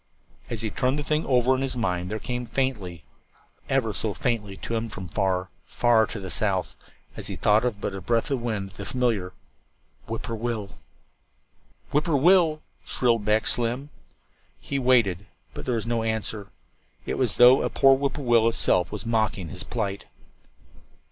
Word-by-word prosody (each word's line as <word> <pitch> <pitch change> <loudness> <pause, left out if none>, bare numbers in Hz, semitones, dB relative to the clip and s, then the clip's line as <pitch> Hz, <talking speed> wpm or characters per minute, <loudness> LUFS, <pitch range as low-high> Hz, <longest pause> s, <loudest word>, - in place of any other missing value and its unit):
As 115 -2 -4
he 110 - -2
turned 130 +2 0
the 150 - -2
thing 155 +1 0
over 125 -1 +3
in 130 - -1
his 135 -1 -1
mind 90 -5 -1
there 110 - -1
came 125 +2 -4
faintly, 105 - -2 0.7
ever 125 -5 +1
so 105 0 -2
faintly, 115 -8 -2
to - - -5
him 115 0 -1
from 95 -3 -7
far, 95 0 -1 0.2
far 115 -2 +3
to 110 - -6
the 95 -2 -6
south, 95 -4 -1 0.4
as - - -7
though 110 +4 +2
but - - -3
a 95 - -6
breath 115 - 0
of 135 -3 0
wind, 105 -5 -3
the 100 +1 -8
familiar 115 -8 0 0.8
"Whip 115 0 -4
poor 115 -2 -4
will." 110 -3 -3 1.2
"Whip 150 +1 +2
poor 160 -5 +2
will 170 +8 +6
l 175 -4 +5
l," 155 - -16 0.2
shrilled 115 -4 +1
back 105 +1 +2
Slim. 125 +5 -1 0.7
He 140 - -3
waited, 115 -7 +3 0.3
but - - -7
there 125 - 0
was 115 - -2
no 115 -1 0
answer. 110 -2 -3 0.6
It - - -3
was 125 -7 +1
as - - -10
though 125 +2 +8
a - - +1
whip - - -10 0.4
poor 145 - -5
will 115 -2 +4
itself 90 -6 +2
was 105 +1 -6
mocking 110 -6 0
his 90 -2 -5
plight. 100 -4 -3
115 Hz, 180 wpm, -25 LUFS, 100-125 Hz, 1.2 s, though